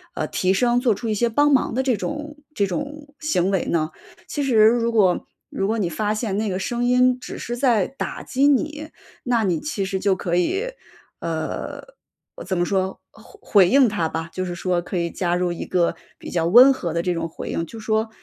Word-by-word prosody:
呃， - - -1
提 185 0 +1
升， 240 +4 +2
做 240 -5 +2
出 230 +1 -5
一 - - +1
些 235 +3 +1
帮 290 +6 +3
忙 265 -4 +2
的 260 +2 0
这 250 -5 +1
种 300 0 -5 0.2
这 200 - +2
种 290 +8 -6
行 195 - 0
为 190 - 0
呢？ 160 -1 0 0.4
其 290 - -2
实 265 -4 0
如 235 0 +2
果 200 -6 +2 0.2
如 195 - -2
果 225 +2 0
你 185 -5 0
发 210 +6 -1
现 215 -2 -2
那 215 0 -1
个 185 0 -2
声 240 +5 -2
音 250 0 +3
只 255 - -8
是 240 0 -4
在 240 -7 +2
打 275 - -6
击 275 +3 +2
你， 300 +2 0 0.3
那 240 -3 +1
你 175 -5 +1
其 215 -10 -3
实 190 0 -2
就 195 -1 +2
可 175 -2 -2
以 380 - +1 0.6
呃， 160 -1 -4 0.6
怎 190 - -2
么 175 - +2
说， 190 0 -1
回 220 - -18
回 195 -4 +5
应 265 -2 +5
它 175 -6 -1
吧， 160 +1 -4
就 185 +1 -3
是 175 - -4
说 180 0 0
可 175 - -7
以 170 0 -1
加 175 0 -1
入 180 0 0
一 170 - -5
个 175 -2 +1 0.2
比 - - -8
较 165 -2 0
温 245 +10 +8
和 175 -11 -3
的 170 - 0
这 180 +1 0
种 165 - -2
回 165 - -8
应。 165 - -2
就 225 +7 -10
说 220 0 0
215 Hz, 235 characters per minute, -22 LUFS, 180-250 Hz, 0.6 s, 温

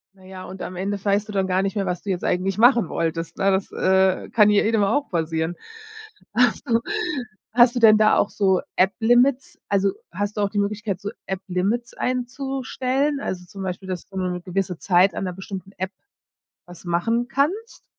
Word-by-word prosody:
Na 190 - -20
ja, 185 0 -9
und 190 +1 -9
am 185 - -6
Ende 195 +2 -3
weißt 205 +1 +1
du - - -7
dann 195 -2 0
gar 185 +1 +1
nicht 195 +2 -2
mehr, 195 -2 -1
was 180 -1 -3
du 200 - -2
jetzt 180 - -3
eigentlich 190 +3 0
machen 240 -5 +5
wolltest, 165 0 -3
ne? 195 0 +2
Das, 190 0 -1
äh, 190 0 +2
kann 210 -2 +5
ja 205 - +4
jedem 220 -1 +2
auch 280 +9 0
passieren. 165 0 -1 0.8
Hast 245 -1 +2
du 230 0 +3 0.7
hast 240 +1 +5
du - - +1
denn 220 -2 +7
da 215 0 +4
auch - - +2
so 190 -3 +2
App-Limits? 240 +7 +2
Also 200 -1 +2 0.2
hast 205 +4 -3
du - - +1
auch 200 - +1
die 210 - -6
Möglichkeit, 205 -2 -2
so 205 - -4 0.2
App-Limits 195 +5 -2
einzustellen? 265 +2 -2
Also 180 -7 -4
zum 195 +2 -10
Beispiel, 190 +1 -5
dass 185 -2 -5
du 195 - -10
nur 185 -1 -1
'ne 180 0 -4
gewisse 185 0 -2
Zeit 185 +2 +3
an - - -3
'ner 180 - -3
bestimmten 190 0 -8
App 190 +1 -3 0.8
was 175 0 -13
machen 225 +8 0
kannst? 355 - -1
195 Hz, 195 wpm, -23 LUFS, 185-230 Hz, 0.8 s, denn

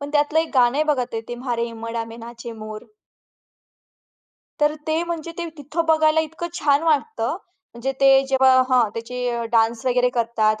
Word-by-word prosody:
पण 285 0 -6
त्यातलं 295 +1 +2
एक 325 - -4
गाणं 245 0 +4
आहे 305 - +2
बघा 255 -4 -1
ते, 225 - -2
ते 240 - -4
म्हारे 240 -1 -2
हीबाडा 230 0 -5
में 225 - -10
नाचे 235 +1 -9
मोर. 215 -1 -8 1.8
तर 295 +1 +3
ते 315 +1 +1
म्हणजे 335 -1 -5
ते 340 -1 -3
तिथं 300 +3 -3
बघायला 315 0 +4
इतकं 325 +2 -5
छान 290 -3 +2
वाटतं, 325 +7 0 0.4
म्हणजे 260 +3 -3
ते 275 - +6 0.2
जेव्हा 265 -1 +4 0.2
हां 250 -4 +4
त्याचे 235 0 -3
डान्स 225 0 +2
वगैरे 250 0 +3
करतात 220 -2 +1
255 Hz, 170 wpm, -22 LUFS, 235-310 Hz, 1.8 s, ते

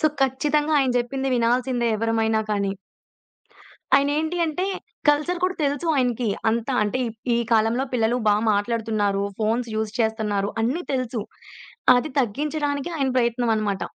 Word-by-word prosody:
So, 310 - +4 0.2
ఖచ్చితంగా 295 +3 +1
ఆయన 265 -2 +2
చెప్పింది 265 +2 -2
వినాల్సిందే 245 +1 +1
ఎవరమైనా 225 0 +1
కానీ. 200 -2 0 1.2
ఆయనేంటి 300 +4 +1
అంటే 325 +4 -2 0.4
కల్చర్ 300 +5 +2
కూడా 370 0 0
తెలుసు 285 +4 -1
ఆయనకి. 245 -3 0 0.2
అంతా 235 +3 -1
అంటే 210 +5 -1
ఈ - - -1 0.3
ఈ - - +1
కాలంలో 225 +4 +2
పిల్లలు 235 +1 +1
బా 205 - +5 0.2
మాట్లాడుతున్నారు, 205 -2 0 0.2
ఫోన్స్ 230 +3 0
యూజ్ 220 -1 -2
చేస్తున్నారు, 215 -3 0
అన్నీ 265 +10 0
తెలుసు. 255 -4 -2 0.7
అది 245 +5 -1
తగ్గించడానికి 285 +5 -2
ఆయన 270 -1 +1
ప్రయత్నం 240 0 +1
అనమాట. 205 -3 -1
240 Hz, 135 wpm, -23 LUFS, 220-280 Hz, 1.2 s, బా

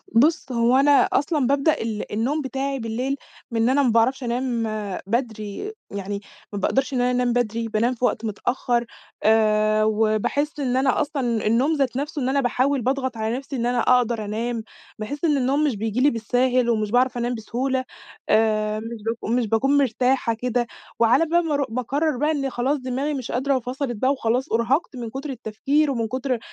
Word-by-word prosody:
بُص، 275 +2 +3
هو 235 +1 +3
أنا 280 +2 +5 0.2
أصلًا 290 -3 +1
بابدأ 280 +3 +2
ال 220 -2 -4
النوم 255 +9 0
بتاعي 270 0 -3
بالليل 245 +4 -2 0.4
من 230 +1 +2
أنا 280 +2 +3
ما 250 - +3
باعرفش 230 +4 +2
أنام 240 -1 -1 0.4
بدري، 225 - -3 0.2
يعني 200 0 -4 0.3
ما 205 - -2
بأقدرش 270 +7 0
إن 245 - +1
أنا 250 - +2
أنام 245 -1 +1
بدري، 230 -1 -1
بانام 230 +3 0
في 245 - 0
وقت 230 - -1
متأخر. 240 +2 -1 0.4
آآ، 215 -1 +3
وباحس 220 +8 0
إن 255 -3 0
أنا 260 -1 +2
أصلًا 255 -7 -1
النوم 250 +8 +3
ذات 270 -3 0
نفسه، 290 +1 -3
إن 255 - 0
أنا 280 +1 +2
باحاول 260 +2 +1
باضغط 260 0 -1
على 220 +2 -1
نفسي 275 +1 -7
إن 235 -2 -1
أنا 245 0 +1
أقدر 235 -3 +2
أنام. 225 +2 -3 0.4
باحس 285 +9 -3
إن 300 -3 +3
النوم 275 +3 +1
مش 285 -6 +1
بييجي 220 +3 -2
لي 285 - +6
بالساهل 245 +1 +1
ومش 215 -3 0
باعرف 250 +1 +2
أنام 240 +1 -1
بسهولة. 255 +4 -2 0.4
آآ، 215 -1 +2
مش 225 -1 -7
باك 225 0 -3
مش 240 -1 +1
باكون 265 +7 +2
مرتاحة 255 -2 +2
كده، 240 +1 -1 0.3
وعلى 235 +8 +4
بال 340 +1 +2
ما 310 - -1
أرو 285 -1 +1
باقرر 265 +5 -1
بقى 300 +4 +1
إن 275 -3 -1
خلاص 260 +4 0
دماغي 265 +3 -2
مش 260 -4 -4
قادرة 270 +3 +1
وفَصَلِت 255 0 -3
بقى 260 +6 +1
وخلاص 255 +1 -1
أُرهقت 255 +7 +1
من 235 -2 -5
كتر 270 +5 -6
التفكير 270 +5 0
ومن 230 -4 -1
كتر 255 +3 -2
إن 240 - -2
250 Hz, 190 wpm, -23 LUFS, 225-275 Hz, 0.4 s, لي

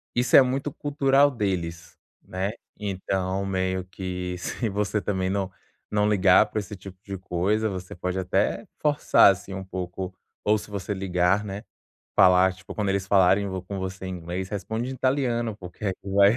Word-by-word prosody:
isso 125 +1 0
é - - +10
muito 135 +3 0
cultural 140 0 +3
deles, 90 -8 -3 0.3
né? 95 +3 -3 0.3
Então 95 -1 -2
meio 95 -1 -1
que 90 -1 -5
se 110 +5 -3
você 105 +1 -1
também 95 -2 -1
não 95 -1 -1 0.4
não 105 0 +2
ligar 95 -3 +5
pra 110 - -2
esse 105 +1 -6
tipo 95 -1 -11
de 100 -2 -6
coisa, 95 +5 0
você 95 -1 -6
pode 90 +2 -3
até 90 - 0 0.2
forçar, 145 -8 +5
assim, 95 +1 -6
um 95 0 -5
pouco. 95 0 -5 0.3
Ou 105 +1 +3
se 105 - -9
você 100 0 -3
ligar, 95 +1 +1
né, 100 +2 -6 0.5
falar, 95 -1 +6
tipo, 95 0 -11
quando 105 -2 0
eles 95 -1 -1
falarem, 95 +1 +4
ou 95 -1 -4
com 95 +2 -6
você 95 0 -5
em - - -4
inglês, 90 +3 -4
responde 110 +5 -3
em - - -3
italiano. 125 -5 0
Porque, 90 +1 -10
aí, 95 - 0
vai 100 +2 +4
95 Hz, 175 wpm, -25 LUFS, 95-105 Hz, 0.5 s, é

